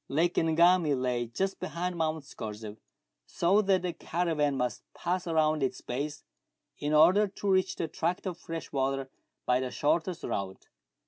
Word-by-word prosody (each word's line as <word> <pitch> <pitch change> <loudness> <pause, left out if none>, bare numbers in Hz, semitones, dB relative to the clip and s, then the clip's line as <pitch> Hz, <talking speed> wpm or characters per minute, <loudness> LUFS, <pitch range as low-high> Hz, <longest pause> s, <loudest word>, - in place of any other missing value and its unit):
Lake 170 +5 +2
Ngami 165 -1 +4
lay 125 -2 -1
just 190 +12 -2
behind 180 +1 -3
Mount 160 -2 -1
Scorzef, 105 -4 -7 0.5
so 190 +5 +3
that 190 -3 +2
the 180 -1 -2
caravan 160 -5 0
must 125 -4 -1
pass 180 +1 -2
round 155 -2 +2
its 130 - -1
base 145 +4 -4 0.6
in 145 - -2
order 175 +7 +6
to 200 0 -2
reach 185 0 +2
the 165 - -2
tract 170 +5 -2
of 180 -2 -4
fresh 165 -1 -6
water 135 -1 -1 0.3
by 125 0 +3
the 130 -1 -2
shortest 165 +6 0
route. 95 -1 -4
160 Hz, 155 wpm, -29 LUFS, 135-175 Hz, 0.6 s, order